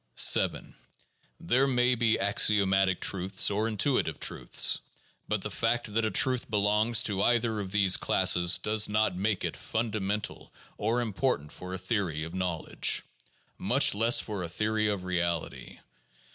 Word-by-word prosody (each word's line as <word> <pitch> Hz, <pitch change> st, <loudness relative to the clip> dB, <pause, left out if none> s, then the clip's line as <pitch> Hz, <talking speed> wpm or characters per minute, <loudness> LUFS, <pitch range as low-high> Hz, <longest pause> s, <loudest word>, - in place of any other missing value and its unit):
7. -, -, +2 dB, 0.7 s
There 130 Hz, +10 st, +1 dB
may 125 Hz, -1 st, +2 dB
be 115 Hz, -2 st, +1 dB
axiomatic 95 Hz, -2 st, +2 dB
truths 95 Hz, +1 st, +1 dB
or 105 Hz, +2 st, -1 dB
intuitive 115 Hz, +5 st, -1 dB
truths. -, -, 0 dB, 0.5 s
But -, -, -2 dB
the -, -, -4 dB
fact 115 Hz, -1 st, -1 dB
that 115 Hz, +1 st, 0 dB
a -, -, 0 dB
truth 130 Hz, +2 st, +1 dB
belongs 105 Hz, +2 st, +2 dB
to 100 Hz, -2 st, -2 dB
either 120 Hz, -2 st, +1 dB
of 95 Hz, -2 st, -6 dB
these 100 Hz, -2 st, +3 dB
classes 90 Hz, 0 st, +3 dB
does 105 Hz, -1 st, +1 dB
not 105 Hz, -2 st, +1 dB
make 100 Hz, +1 st, -1 dB
it -, -, -3 dB
fundamental 105 Hz, -2 st, -4 dB, 0.2 s
or 115 Hz, +4 st, -1 dB
important 105 Hz, -, -2 dB
for 90 Hz, 0 st, -9 dB
a 95 Hz, -, -4 dB
theory 95 Hz, -5 st, -2 dB
of 80 Hz, +1 st, -7 dB
knowledge, 90 Hz, -3 st, -1 dB, 0.6 s
much -, -, +2 dB
less 115 Hz, +5 st, +3 dB
for 105 Hz, -4 st, -4 dB
a 85 Hz, -, -5 dB
theory 110 Hz, +4 st, -1 dB
of 100 Hz, -3 st, -2 dB
reality. 85 Hz, -2 st, -3 dB
105 Hz, 145 wpm, -28 LUFS, 95-115 Hz, 0.7 s, these